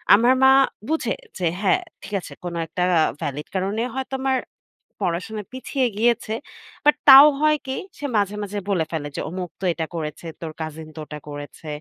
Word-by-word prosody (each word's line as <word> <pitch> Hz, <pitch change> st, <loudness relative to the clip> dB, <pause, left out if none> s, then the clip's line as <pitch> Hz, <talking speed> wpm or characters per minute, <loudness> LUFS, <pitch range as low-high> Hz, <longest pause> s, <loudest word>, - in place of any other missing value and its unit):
আমার 240 Hz, +4 st, +5 dB
মা 265 Hz, -, +8 dB, 0.4 s
বুঝে 320 Hz, -, 0 dB, 0.2 s
যে 180 Hz, -, -2 dB, 0.2 s
হ্যা 215 Hz, -, +4 dB, 0.3 s
ঠিক -, -, -9 dB
আছে -, -, -10 dB
কোন 175 Hz, -1 st, -4 dB
একটা 180 Hz, +3 st, -2 dB, 0.4 s
ভ্যালিড 145 Hz, 0 st, -4 dB
কারণে 195 Hz, +4 st, -1 dB
হয়তো 265 Hz, 0 st, -3 dB
আমার 265 Hz, -1 st, +2 dB, 0.7 s
পড়াশোনা 195 Hz, +5 st, -2 dB
পিছিয়ে 260 Hz, 0 st, -1 dB
গিয়েছে। 230 Hz, -1 st, +1 dB, 0.5 s
বাট 295 Hz, 0 st, +6 dB
তাও 270 Hz, +2 st, +12 dB
হয় 305 Hz, 0 st, +4 dB
কি 265 Hz, -, -2 dB, 0.2 s
সে 290 Hz, -, -5 dB
মাঝে, 205 Hz, 0 st, +1 dB
মাঝে, 205 Hz, +1 st, -5 dB
বলে 180 Hz, -5 st, +1 dB
ফেলে 155 Hz, -3 st, -3 dB
যে -, -, -2 dB
"অমুক 180 Hz, 0 st, -5 dB
তো 190 Hz, -, -2 dB
এটা 160 Hz, -1 st, -3 dB
করেছে, 155 Hz, +1 st, -5 dB
তোর 160 Hz, -2 st, -4 dB
কাজিন 155 Hz, 0 st, -6 dB
তো -, -, -8 dB
ওটা 150 Hz, 0 st, -8 dB
করেছে" 145 Hz, +2 st, -9 dB
195 Hz, 180 wpm, -23 LUFS, 160-255 Hz, 0.7 s, তাও